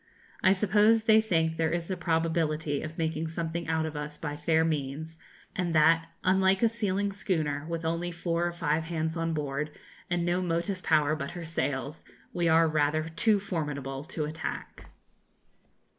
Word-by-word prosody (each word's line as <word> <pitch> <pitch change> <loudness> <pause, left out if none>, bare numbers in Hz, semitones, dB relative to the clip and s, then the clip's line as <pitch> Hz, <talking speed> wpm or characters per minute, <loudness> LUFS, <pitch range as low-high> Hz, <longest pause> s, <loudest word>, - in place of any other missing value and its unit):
I 190 - +6
suppose 210 +3 +4
they 220 0 +6
think 165 -6 +1
there 160 -1 +1
is 170 +2 -2
a - - 0
probability 160 -3 0
of 155 +1 -7
making 160 0 -1
something 165 0 -3
out 160 0 +1
of 155 -1 -5
us 150 0 -5
by 145 -2 -4
fair 160 +2 +2
means, 155 +1 -3 0.4
and 175 -4 -1
that, 165 +1 +5 0.2
unlike 190 +2 +3
a 230 - +6
sealing 205 -3 -1
schooner, 155 -7 -2
with 165 -1 -3
only 165 +2 -1
four 170 0 -1
or - - -2
five 160 -2 -1
hands 160 -1 -2
on 165 -1 -1
board, 145 0 -2 0.4
and 175 -1 0
no 175 +1 +1
motive 175 +2 -1
power 155 -2 +3
but 140 -2 -4
her 170 - -6
sails, 145 -2 -3 0.3
we 175 -1 +1
are 165 0 +5
rather 155 +1 +1
too 205 +6 +2
formidable 145 -8 -4
to 155 -1 -3
attack. 155 +2 -6
165 Hz, 170 wpm, -29 LUFS, 155-175 Hz, 0.4 s, I